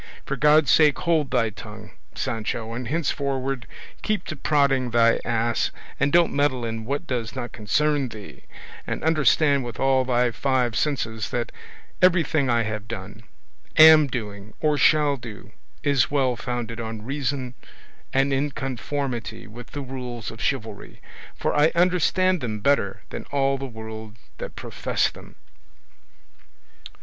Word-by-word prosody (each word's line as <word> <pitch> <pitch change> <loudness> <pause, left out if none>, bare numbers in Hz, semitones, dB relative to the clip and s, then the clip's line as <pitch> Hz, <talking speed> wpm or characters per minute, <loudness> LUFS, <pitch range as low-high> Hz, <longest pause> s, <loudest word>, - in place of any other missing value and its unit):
for - - -2
God's 150 -2 +4
sake 150 -2 +5
hold 160 -5 +1
thy 115 -4 +1
tongue, 105 +1 -11 0.2
Sancho, 115 -2 -3
and 125 0 -5
henceforward 135 -3 -2 0.3
keep 215 -1 -1
to 155 - -5
prodding 140 -3 +2
thy 115 -1 +4
ass 115 0 0 0.3
and 140 +1 +2
don't 170 +1 +4
meddle 135 -4 +1
in 115 -1 -4
what 140 +4 -2
does 120 -1 -3
not 120 -2 -5
concern 140 +6 0
thee; 105 -3 -11 0.4
and - - -3
understand 155 -3 +3
with 120 -1 -7
all 135 -1 +3
thy 125 -1 +1
five 125 -2 0
senses 115 -6 -1
that 120 -1 -2 0.5
everything 165 -6 +3
I 120 -1 +3
have 110 -1 -4
done, 105 -1 -7 0.6
am 155 -1 +9
doing, 105 -4 -6
or 150 -1 +2
shall 145 -1 +4
do, 115 -4 -10 0.3
is 140 -3 +2
well 135 -3 +1
founded 120 -2 -4
on 110 -2 -5
reason 135 -1 -2 0.6
and 135 +1 +2
in 140 +2 +1
conformity 130 -3 -4
with 115 +2 -11
the 145 - -6
rules 125 -3 -6
of 115 - -10
chivalry, 110 -6 -3 0.4
for - - -1
I 150 +2 +4
understand 180 0 +2
them 110 -4 -3
better 100 -7 +1
than - - -6
all 135 -1 0
the 135 - -4
world 110 -2 -8 0.2
that - - -6
profess - - -1
them." - - -14
130 Hz, 145 wpm, -24 LUFS, 115-145 Hz, 0.6 s, am